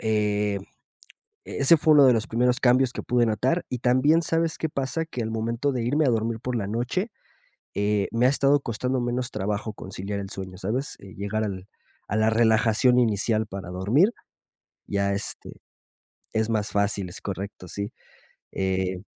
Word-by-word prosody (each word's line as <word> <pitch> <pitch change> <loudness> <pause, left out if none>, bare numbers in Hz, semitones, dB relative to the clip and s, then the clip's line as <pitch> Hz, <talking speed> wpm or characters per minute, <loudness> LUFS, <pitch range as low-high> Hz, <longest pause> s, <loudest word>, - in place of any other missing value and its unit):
eh, 105 -2 +1 0.9
e - - -6
ese 140 +5 +6
fue 155 0 +4
uno 145 -2 +8
de 125 - +7
los 115 -2 0
primeros 125 +2 +2
cambios 125 0 +3
que - - -6
pude 120 -1 +2
notar 125 - 0
y 125 - -3
también, 130 +7 +3
¿sabes 165 0 0
qué 160 - -1
pasa?, 140 +3 -2
que 125 -7 -5
al 110 - -3
momento 115 +5 -1
de 125 -3 -2
irme 145 +4 +2
a - - +3
dormir 115 -1 0
por 125 0 -3
la 100 - -2
noche, 125 - -2 0.6
eh, 100 0 +1
me 115 +2 +2
ha - - +5
estado 140 +1 +3
costando 125 +1 -2
menos 120 0 -2
trabajo 105 +2 -3
conciliar 100 +1 -5
el 95 - -7
sueño, 95 -2 -7
¿sabes?, 115 +9 -3
eh 100 -1 -12
llegar 105 +2 -2
al 95 -2 -5 0.4
a 105 - -1
la 110 0 +3
relajación 110 +2 +4
inicial 110 -1 +1
para 95 -3 -7
dormir, 105 - +2 0.8
ya, 100 0 0
este, 100 +1 -6 0.7
es 110 0 0
más 110 -2 0
fácil, 100 -1 0
es 90 - -9
correcto, 100 -2 -6
sí. 100 +3 -5 0.6
Eh. 95 -1 -1
110 Hz, 175 wpm, -25 LUFS, 100-125 Hz, 0.9 s, uno